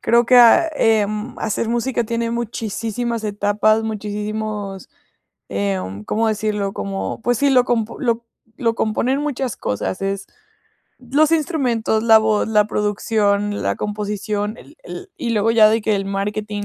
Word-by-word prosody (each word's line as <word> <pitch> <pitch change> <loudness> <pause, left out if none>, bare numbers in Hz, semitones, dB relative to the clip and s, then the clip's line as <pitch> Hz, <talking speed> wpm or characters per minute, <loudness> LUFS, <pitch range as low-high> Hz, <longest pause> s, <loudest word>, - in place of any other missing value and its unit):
creo 235 0 +3
que 250 +1 +6
a 245 +8 +7
em, 215 -2 0
hacer 220 +1 -2
música 240 0 0
tiene 230 +1 -2
muchisísimas 230 0 -3
etapas, 210 +1 +1
muchisísimos, 210 -2 -4 0.6
em, 100 0 -3
¿cómo 225 +1 0
decirlo? 210 -2 -1
Como, 95 -1 -4
pues 245 -2 +1
sí, 285 0 +3
lo 255 -2 +5
comp 230 -3 0
lo 235 -3 -1 0.3
lo 230 -4 0
componen 240 +5 0
muchas 270 -5 -2
cosas. 105 - -3
Es 195 0 -2 0.7
los 285 +5 +2
instrumentos, 255 -9 +1
la 225 -1 +7
voz, 220 -1 +1
la 210 -1 +3
producción, 205 -1 0
la - - -1
composición, 210 +1 -3
el - - -16
el, 380 +1 -8
y 235 - -3
luego 220 0 +2
ya 220 -2 +6
de 225 +1 +2
que 210 -1 +1
el 195 - -2
marketing, 205 +1 -3
215 Hz, 150 wpm, -20 LUFS, 205-235 Hz, 0.7 s, a